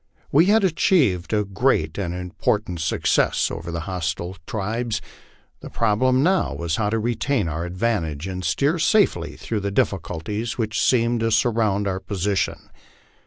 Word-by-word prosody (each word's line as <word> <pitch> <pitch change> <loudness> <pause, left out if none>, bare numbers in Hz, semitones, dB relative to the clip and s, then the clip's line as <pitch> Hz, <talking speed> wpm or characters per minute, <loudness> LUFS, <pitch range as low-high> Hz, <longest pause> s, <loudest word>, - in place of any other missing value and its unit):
We 155 +5 +5
had 215 +1 +4
achieved 150 - +2
a 105 -1 +2
great 95 -6 0
and 90 -4 -2
important 90 +1 -2
suc 80 - -2
cess - - +2
over 85 +1 -6
the 85 0 -3
hostile 85 +1 -3
tribes; 110 +2 -2 0.6
the - - -9
problem 130 +4 +2
now 185 +2 +2
was 85 -1 -2
how 105 -2 0
to 115 - 0
retain 120 -1 0
our 80 +2 -3
advantage 90 -5 -2
and 95 -1 -5
steer 140 - +1
safely 205 +5 +2
through 110 - -3
the 100 0 -2
difficulties 100 +3 -2
which 110 -2 -1
seemed 120 -1 +2
to 115 0 +1
surround 110 -3 +1
our 95 -1 -1
posi 100 0 -2
tion. - - -2
105 Hz, 160 wpm, -23 LUFS, 90-120 Hz, 0.6 s, We